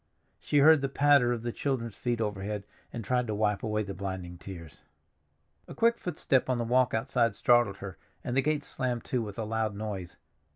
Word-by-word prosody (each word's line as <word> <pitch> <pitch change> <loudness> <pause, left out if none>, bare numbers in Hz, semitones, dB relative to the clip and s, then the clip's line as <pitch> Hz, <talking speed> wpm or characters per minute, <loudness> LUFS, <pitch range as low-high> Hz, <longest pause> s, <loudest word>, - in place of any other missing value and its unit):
She 145 - 0
heard 155 +1 +7
the 135 - -1
patter 140 -3 +4
of 120 -2 -2
the 120 - -2
children's 115 -5 -2
feet 120 +1 -2
overhead, 105 -1 -3 0.3
and 115 -3 -6
tried 125 +3 +1
to 105 - -2
wipe 105 -1 +1
away 110 -1 -1
the 100 -1 -6
blinding 95 -3 -6
tears. 85 -6 -10 0.9
A - - -9
quick 235 +1 +3
footstep 140 -7 0
on 130 - +2
the 120 - -1
walk 125 +1 +2
outside 115 -1 +1
startled 120 -5 +3
her, 95 -2 -8 0.2
and 125 - -3
the 135 - +4
gate 150 +1 0
slammed 125 -2 -2
to 125 - -1
with 105 -3 -6
a 115 - -2
loud 110 -1 -1
noise. 100 -4 -5
115 Hz, 200 wpm, -29 LUFS, 100-130 Hz, 0.9 s, heard